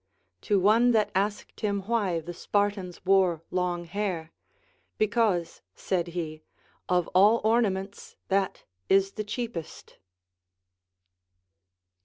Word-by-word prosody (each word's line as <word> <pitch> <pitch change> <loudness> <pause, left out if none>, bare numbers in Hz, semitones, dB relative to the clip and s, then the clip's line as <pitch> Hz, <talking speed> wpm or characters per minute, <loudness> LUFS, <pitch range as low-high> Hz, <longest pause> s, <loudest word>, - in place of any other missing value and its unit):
To 205 - +4
one 225 +6 +4
that 215 -2 +2
asked 200 +2 -2
him 200 -2 -1
why 195 -5 0
the 175 +2 -7
Spartans 200 -1 -2
wore 185 -4 +3
long 180 -1 -1
hair, 175 -3 -3 0.7
Because, 215 -5 +1
said 175 -2 -1
he, 155 -2 -4 0.5
of 180 -1 +2
all 205 +5 +5
ornaments 200 -3 0
that 195 0 0 0.3
is 195 0 +4
the 215 - -4
cheapest. 215 -6 -6
195 Hz, 105 wpm, -27 LUFS, 180-210 Hz, 0.7 s, all